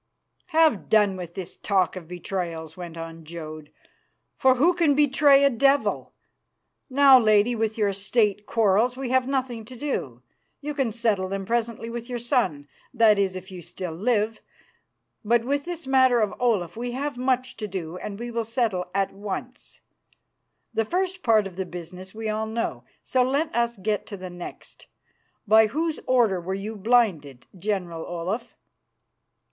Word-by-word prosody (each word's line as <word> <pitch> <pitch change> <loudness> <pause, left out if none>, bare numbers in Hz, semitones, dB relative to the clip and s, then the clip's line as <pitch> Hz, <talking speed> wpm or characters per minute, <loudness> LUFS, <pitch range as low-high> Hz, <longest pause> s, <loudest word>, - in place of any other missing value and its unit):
"Have 320 - +3
done 210 -3 +4
with 175 -2 -8
this 185 -3 -6
talk 190 -4 +1
of 175 -3 -8
betrayals," 175 -2 -5
went 175 -2 -8
on 165 0 -8
Jodd, 155 -2 -8 0.7
"for 260 -1 +4
who 320 +8 +4
can 330 -5 +3
betray 285 -1 +5
a 280 - +6
devil? 275 +4 +2 0.8
Now, 275 -1 +7
Lady, 215 +1 +4
with 220 -1 -1
your 205 -2 +1
State 205 +1 0
quarrels 225 +3 +2
we 265 -2 -4
have 260 -1 +2
nothing 260 -4 -2
to 255 - -11
do. 140 - -4 0.4
You 295 +1 -4
can 270 -5 0
settle 215 -4 0
them 195 0 -3
presently 230 +1 -1
with 235 +1 -6
your 245 - -2
son, 235 - 0 0.2
that 225 -4 +4
is, 190 -2 +1
if 185 +1 -8
you 180 -1 -8
still 175 +1 -6
live. 215 +3 0 0.8
But 230 +2 +2
with 280 +2 -1
this 340 -3 -5
matter 260 -2 +4
of 215 -2 +1
Olaf 205 -9 +1
we 240 +1 -4
have 280 +2 -3
much 255 +1 0
to 210 - -4
do, 180 -4 -5
and 200 +1 -6
we 240 +2 -6
will 230 0 -1
settle 220 -6 -1
that 195 -1 +1
at - - -21
once. 200 -1 -7 0.9
The 225 - +1
first 370 - -2
part 220 - +4
of 185 -2 -8
the 190 - -2
business 180 +3 -9
we 220 0 -4
all 215 +1 -1
know, 230 +1 -3 0.2
so 255 - +1
let 280 +5 0
us 235 -1 0
get 205 +1 -2
to 200 - -7
the 185 -1 -8
next. 175 0 -10 0.6
By 220 +1 +6
whose 315 +6 -2
order 230 -8 +3
were 190 +3 -3
you 210 +3 -5
blinded, 190 - +1
General 180 -4 -3
Olaf?" 185 +7 -4
220 Hz, 170 wpm, -25 LUFS, 185-250 Hz, 0.9 s, Now